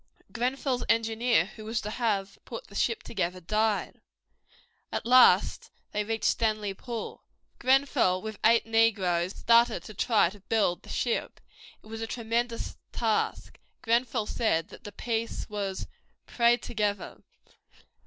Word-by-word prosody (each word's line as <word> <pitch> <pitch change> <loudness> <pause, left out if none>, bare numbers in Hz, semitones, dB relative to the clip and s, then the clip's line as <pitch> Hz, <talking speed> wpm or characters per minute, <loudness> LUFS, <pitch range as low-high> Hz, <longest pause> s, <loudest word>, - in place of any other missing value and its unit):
Grenfell's 250 +1 -1
engineer, 225 -3 +2
who 215 +2 -12
was 220 +1 -2
to 210 - -5
have 200 -4 -1
put 230 - -8
the - - -17
ship 230 +3 0
together, 185 -3 -3
died. 215 +4 -1 0.9
At - - -3
last 250 +1 +5 0.2
they 210 - -1
reached 225 +1 -3
Stanley 215 -3 +1
Pool. 230 +3 -7 0.4
Grenfell 260 -8 +3
with 220 +1 -7
eight 230 +1 +5
negroes 195 -6 +2
started 235 +1 +3
to 215 - -10
try 210 -3 +2
to 205 - -14
build 200 -3 0
the - - -15
ship. 240 - -2 0.4
It - - -20
was 225 +1 -7
a 225 - -3
tremendous 235 0 -2
task. 220 -3 -1 0.2
Grenfell 235 -1 +1
said 195 -7 0
the 205 - -10
Peace 230 +2 -3
was 200 -2 -3 0.4
"prayed 240 0 +2
together." 210 -3 -3
225 Hz, 135 wpm, -28 LUFS, 205-235 Hz, 0.9 s, last